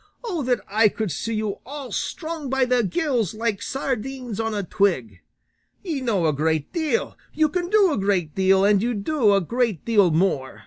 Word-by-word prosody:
O 375 -9 -2
that 250 -2 0
I 215 +2 +4
could 215 -3 -3
see 225 +9 -3
you 215 -2 -2
all 275 0 -8
strung 320 -4 -4
by 265 0 +2
the 250 -1 +2
gills, 245 - -1
like 220 -2 -2
sardines 260 -2 -4
on 225 0 -1
a 205 -2 -2
twig! 145 - 0 0.6
Ye 320 -8 -3
know 210 -9 0
a 155 - +2
great 155 +1 -1
deal, 330 +6 -1 0.2
ye 310 0 +3
can 350 +2 -2
do 405 -3 +4
a - - -1
great 190 -6 0
deal, 190 0 +3
and 205 -1 +4
ye 240 +1 -1
do 215 0 +2
a 195 - +3
great 230 - -1
deal 205 -6 +4
more. 160 -5 0
225 Hz, 190 wpm, -23 LUFS, 195-270 Hz, 0.6 s, I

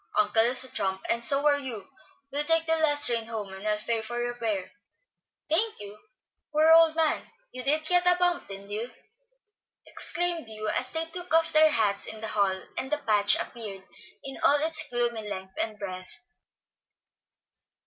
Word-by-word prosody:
Uncle 210 +1 +3
is 250 +2 0
a 260 - -5
trump, 190 -1 -2
and 235 0 -1
so 275 +4 +4
are 290 -1 +4
you. 230 -8 -7 0.4
We'll 290 +2 -1
take 325 +1 +2
the 325 0 +2
last 295 -2 +2
train 230 -2 -1
home, 210 -4 -6
and 190 +2 -7
I'll 210 0 +1
pay 225 +1 -2
your 240 +2 -3
fare." 215 -6 -3 0.8
"Thank 425 +8 +2
you. 205 0 -9 0.6
Poor 310 +1 +4
old 325 -1 +6
man, 320 -2 0 0.2
you 255 - -6
did 300 +4 0
get 355 +1 +4
a 360 - +7
bump, 355 -1 +2
didn't 195 +1 -10
you?" 220 +4 -4 1.0
exclaimed 345 -5 -1
Hugh, 215 -1 -5
as 255 +4 -1
they 325 0 -1
took 355 +2 -5
off 325 0 +3
their 310 0 +6
hats 210 -7 0
in 220 - -8
the 220 0 -4
hall, 195 -3 0 0.2
and 265 - -5
the 300 - +1
patch 210 -6 +2
appeared 205 -5 -6 0.4
in 270 -1 -7
all 290 - +4
its 320 0 0
gloomy 235 -3 -2
length 190 -1 -7
and 215 -1 -4
breadth. 185 -2 -7
240 Hz, 180 wpm, -27 LUFS, 210-315 Hz, 1.0 s, a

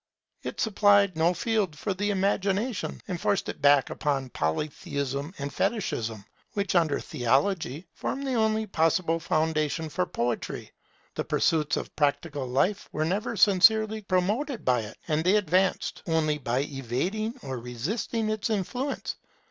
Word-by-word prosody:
It - - -6
supplied 205 -4 +4
no 165 +2 +3
field 210 -9 0
for 200 +5 -2
the 205 +2 -1
Imagination, 200 +3 0
and 180 -4 -4
forced 200 - +1
it - - -6
back 140 -2 +5
upon 135 -3 -1
Polytheism 140 - -2
and 140 0 -4
Fetichism, 115 - -1 0.3
which, 200 -1 -1
under 165 -5 +3
Theology, 145 +5 0
form 275 - -3
the 270 -2 -1
only 220 -1 +2
possible 165 -2 +1
foundation 155 0 0
for 180 +4 -1
poetry. 120 -1 -3 0.4
The - - -2
pursuits 155 -3 +1
of - - -6
practical 145 -1 0
life 140 +11 0
were 155 - -1
never 200 +6 -1
sincerely 215 +3 +5
promoted 210 +8 0
by 125 -1 +3
it, 110 -1 -7
and 155 -1 +1
they 185 +4 +4
advanced 185 -1 +1
only 155 -2 +1
by 125 -1 0
evading 150 - -2
or 130 -2 -4
resisting 200 - -2
its 215 +1 -2
influence. 245 +7 -2
170 Hz, 140 wpm, -27 LUFS, 145-205 Hz, 0.4 s, back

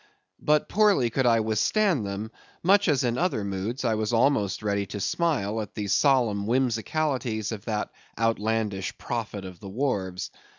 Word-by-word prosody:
But 150 0 +2
poorly 200 - +3
could 130 +1 +1
I 115 -1 +4
withstand 115 - +1
them, 100 +3 -5 0.3
much 200 +3 +4
as 145 -5 +2
in 120 0 0
other 170 - 0
moods 100 +7 -3
I 115 - +2
was 110 +1 -1
almost 115 -6 +2
ready 100 -1 0
to 105 - -6
smile 115 - 0
at 105 - -8
the 105 - -3
solemn 115 -3 +2
whimsicalities 125 -1 0
of 110 -2 -6
that 105 -2 -2 0.3
outlandish 110 -3 -1
prophet 110 -4 -4
of 90 -2 -9
the 100 - -9
wharves. 95 -6 -2
115 Hz, 160 wpm, -26 LUFS, 100-135 Hz, 0.3 s, I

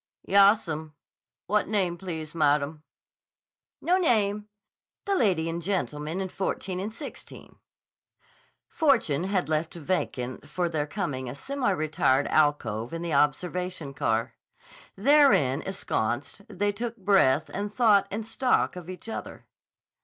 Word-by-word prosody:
"Yassum. 190 -6 +3 0.5
What 210 0 +1
name 190 -5 0
please, 160 -4 -5
maddum?" 150 -1 +1 1.0
"No 360 +2 +3
name. 210 - +1 0.6
The 400 - 0
lady 185 - +2
and 165 +1 -3
gentleman 165 -3 -2
in 190 - -2
14 185 0 -3
and 205 +3 -4
16." 275 +6 -10 1.1
Fortune 225 - +2
had 190 -2 0
left 155 +2 -1
vacant 145 -6 -3
for 175 +3 -1
their 155 -3 -2
coming 145 -8 -3
a 125 - -6
semi 270 - -2
retired 155 -6 +1
alcove 130 -4 +1
in 165 - -5
the 170 -2 -2
observation 170 +2 0
car. 115 -4 -1 0.6
Therein 205 - +4
ensconced, 140 - -3
they 205 0 0
took 230 +3 -5
breath 185 - +3
and 205 +1 -3
thought 210 -4 +4
and 215 +3 -4
stock 250 0 +1
of 180 -1 -9
each 185 +4 -8
other. 225 - -7
180 Hz, 125 wpm, -27 LUFS, 150-205 Hz, 1.1 s, Therein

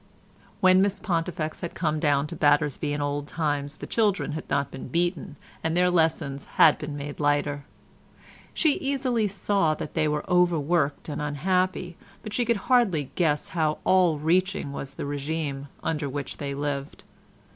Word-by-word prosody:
When 185 0 +6
Miss 200 0 +1
Pontifex 165 -4 -2
had 170 - -5
come 155 -3 0
down 145 -2 +2
to 165 +3 -7
Battersby 145 -1 +2
in 145 0 -2
old 145 0 -2
times 145 -3 -2
the - - -7
children 205 -7 +1
had 155 +1 -6
not 140 0 0
been 135 - -7
beaten, 175 +3 -1 0.3
and 160 +1 0
their 180 0 +4
lessons 160 -5 +1
had 155 - +7
been 150 -1 -5
made 145 0 -6
lighter. 145 -1 0 0.9
She 310 -4 +2
easily 260 -5 0
saw 195 -4 +1
that - - -6
they 155 - +1
were 150 0 -2
overworked 170 -4 +2
and 150 - -4
unhappy, 180 +4 -1 0.3
but 215 -2 -7
she 245 - +1
could 235 -1 +2
hardly 195 - +2
guess 150 -4 0
how 155 -3 0
all 180 -4 +4
reaching 170 0 +1
was 140 -1 -6
the - - -5
régime 145 0 -3 0.2
under 150 -3 -1
which 140 +1 -5
they 140 -2 -4
lived. 140 -1 -4
155 Hz, 165 wpm, -26 LUFS, 145-180 Hz, 0.9 s, had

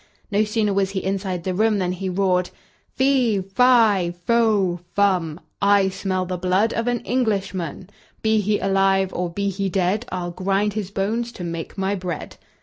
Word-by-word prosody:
No 205 +1 +3
sooner 210 -1 0
was 195 -1 +1
he 195 -1 -3
inside 190 -2 -2
the 185 - -2
room 215 +2 +2
than 180 -2 0
he 185 +1 -3
roared: 180 -1 +1 0.5
"Fee, 260 -6 +2
fi, 200 -3 +3
fo, 215 -7 +2 0.2
fum, 180 -6 +1 0.2
I 200 -1 +4
smell 185 -1 -2
the 180 -1 -4
blood 185 +5 +1
of 230 +1 -2
an 245 -1 0
Englishman; 195 - -2 0.4
Be 220 -1 +3
he 205 +1 +1
alive, 195 0 +2
or 180 0 -2
be 200 +4 -2
he 195 +1 -2
dead, 195 +5 0
I'll 175 -1 -3
grind 195 +3 0
his 205 -3 -3
bones 220 +5 -2
to 180 - -8
make 170 +1 -5
my 195 +1 0
bread!" 180 -4 -5
195 Hz, 170 wpm, -22 LUFS, 185-210 Hz, 0.5 s, I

